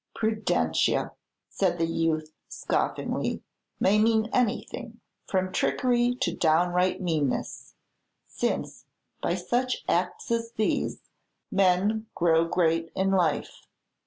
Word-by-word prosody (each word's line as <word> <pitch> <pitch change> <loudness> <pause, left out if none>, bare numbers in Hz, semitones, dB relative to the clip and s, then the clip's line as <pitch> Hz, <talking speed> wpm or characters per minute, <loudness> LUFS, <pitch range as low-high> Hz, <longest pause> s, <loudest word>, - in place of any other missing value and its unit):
"Prudentia," 215 - +1 0.4
said - - 0
the 165 - +1
youth, 160 -1 -1 0.2
scoffingly, - - -2 0.4
"may 205 +3 +4
mean 220 0 +2
anything, 235 0 -1 0.3
from 185 -1 0
trickery 245 +4 +1
to - - 0
downright 175 +3 +2
meanness; 160 -7 -2 0.5
since, - - -3 0.4
by 170 - 0
such 245 +8 -1
acts 440 - -1
as 230 0 -1
these, 215 -2 -1 0.5
men 195 +3 +2
grow 165 -1 +3
great 165 -1 +1
in 195 0 +1
life. 180 -4 0
185 Hz, 100 wpm, -27 LUFS, 165-225 Hz, 0.5 s, may